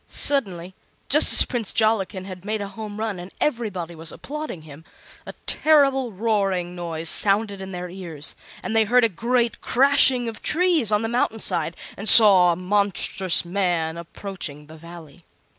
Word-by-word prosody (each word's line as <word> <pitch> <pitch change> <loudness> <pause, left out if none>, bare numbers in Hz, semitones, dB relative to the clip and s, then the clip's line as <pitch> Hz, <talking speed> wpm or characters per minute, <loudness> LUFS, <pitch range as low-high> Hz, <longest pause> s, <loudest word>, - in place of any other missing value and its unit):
Suddenly, 190 -10 0 0.4
just - - +7
as - - +7
Prince 235 -6 -3
Jollikin 205 -4 -1
had 185 -2 -10
made 215 +1 -4
a 200 -1 -6
home 210 0 -9
run 215 -4 -4
and 180 +2 -11
everybody 205 - -3
was 165 0 -6
applauding 300 - -8
him, 155 0 -14 0.4
a - - -8
terrible 275 -5 +2
roaring 195 -4 -2
noise 165 -2 -5
sounded 200 +2 +1
in 190 0 -8
their 180 -1 -7
ears, 170 -5 -9 0.3
and 225 - -4
they 220 -1 +3
heard 245 +3 +2
a 230 - +3
great 235 +3 -2
crashing 265 -2 +2
of 225 -2 -8
trees 330 - +1
on 210 +1 0
the - - -2
mountain 230 -1 -1
side 165 -5 -3 0.2
and 200 +1 +3
saw 195 -6 +8
a - - -2
monstrous 190 -1 0
man 175 -3 -2
approaching 170 -3 -7
the 155 +1 -14
Valley. 170 -1 -14
200 Hz, 165 wpm, -22 LUFS, 175-225 Hz, 0.4 s, saw